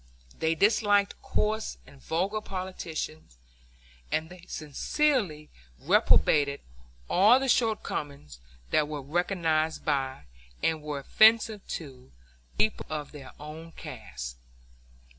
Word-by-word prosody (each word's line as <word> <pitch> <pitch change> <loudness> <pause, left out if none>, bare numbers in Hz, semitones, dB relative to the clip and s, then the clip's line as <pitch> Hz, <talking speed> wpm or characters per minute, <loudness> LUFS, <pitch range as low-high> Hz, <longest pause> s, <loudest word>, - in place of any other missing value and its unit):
They 160 0 +1
disliked 205 +1 +3
coarse 215 +1 -1
and 135 0 -17
vulgar 195 +6 -1
politicians, 170 - -6 0.7
and 160 +2 -1
they 180 -1 -12
sincerely 155 - -1 0.3
reprobated 140 - +3 0.5
all 210 - +6
the 270 - -1
shortcomings 145 - -1 0.3
that 150 -1 +3
were 150 -2 -5
recognized 160 0 0
by, 135 - -1 0.4
and 160 -1 +1
were 150 -1 -4
offensive 220 - +4 0.2
to, 130 -5 -12 0.5
people 110 +1 +1
of 150 -2 -4
their 140 -3 -11
own 160 +3 -9
caste. - - -8
160 Hz, 105 wpm, -28 LUFS, 145-200 Hz, 0.7 s, all